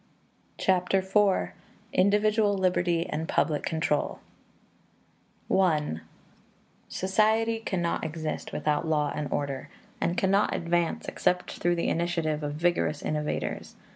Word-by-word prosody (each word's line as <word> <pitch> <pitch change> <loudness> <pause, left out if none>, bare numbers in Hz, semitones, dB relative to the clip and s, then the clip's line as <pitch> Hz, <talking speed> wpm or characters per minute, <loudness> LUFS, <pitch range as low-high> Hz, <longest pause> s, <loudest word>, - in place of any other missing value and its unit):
Chapter 185 0 +2
IV: 195 +1 +2 0.4
Individual 205 +1 +3
Liberty 175 -2 +1
and 160 +1 -3
Public 150 -3 +1
Control 160 -2 -1 1.4
I 155 - +2 0.9
Society 220 +4 +2
cannot 175 -6 -1
exist 160 0 -4
without 150 +2 0
law 150 -2 +1
and 145 -3 -4
order, 140 -2 -3 0.3
and 175 +1 0
cannot 195 +1 +2
advance 170 0 0
except 180 0 0
through 175 0 0
the 170 - 0
initiative 165 -3 0
of 145 0 -3
vigorous 160 -2 0
innovators. 150 0 -3
175 Hz, 105 wpm, -28 LUFS, 155-190 Hz, 1.4 s, Individual